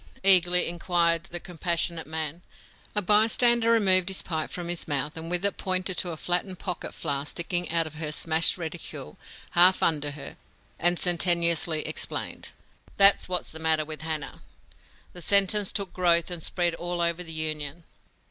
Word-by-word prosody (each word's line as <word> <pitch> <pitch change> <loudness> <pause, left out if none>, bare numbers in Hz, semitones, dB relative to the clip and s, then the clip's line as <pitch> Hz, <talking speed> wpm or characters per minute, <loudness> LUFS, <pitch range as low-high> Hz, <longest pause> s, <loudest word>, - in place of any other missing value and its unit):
eagerly 180 -2 +5
inquired 170 -1 -1
the 175 - -6
compassionate 170 -1 -3
man. 160 +1 -5 0.5
A 210 - 0
bystander 225 +3 +3
removed 190 -5 +4
his 190 - -3
pipe 160 -3 -3
from 175 -1 -5
his 175 -1 -3
mouth, 145 0 -1
and 165 0 -7
with 180 +2 0
it 200 - +1
pointed 185 0 -2
to 180 - -1
a 165 - -6
flattened 180 +3 -2
pocket 180 -1 -5
flask 145 -2 -2
sticking 175 0 -3
out 165 0 +1
of 155 - -9
her 155 -1 -4
smashed 160 +3 +1
reticule, 160 - -7 0.4
half 180 +2 +5
under 150 -3 0
her, 145 0 -8 0.4
and 175 +1 +3
sententiously 170 -2 +3
explained: - - -3 0.5
"That's 200 -1 +6
what's 180 -1 -2
the 160 - -10
matter 160 -1 0
with 155 0 -8
Hannah!" 155 -3 -5 0.7
The 175 - -11
sentence 200 +2 +4
took 200 -3 -4
growth 170 -1 +1
and 175 -2 -6
spread 175 +1 -1
all 175 +1 -5
over 170 +1 -1
the 165 - -8
Union. 155 0 -4
170 Hz, 165 wpm, -25 LUFS, 160-185 Hz, 0.7 s, That's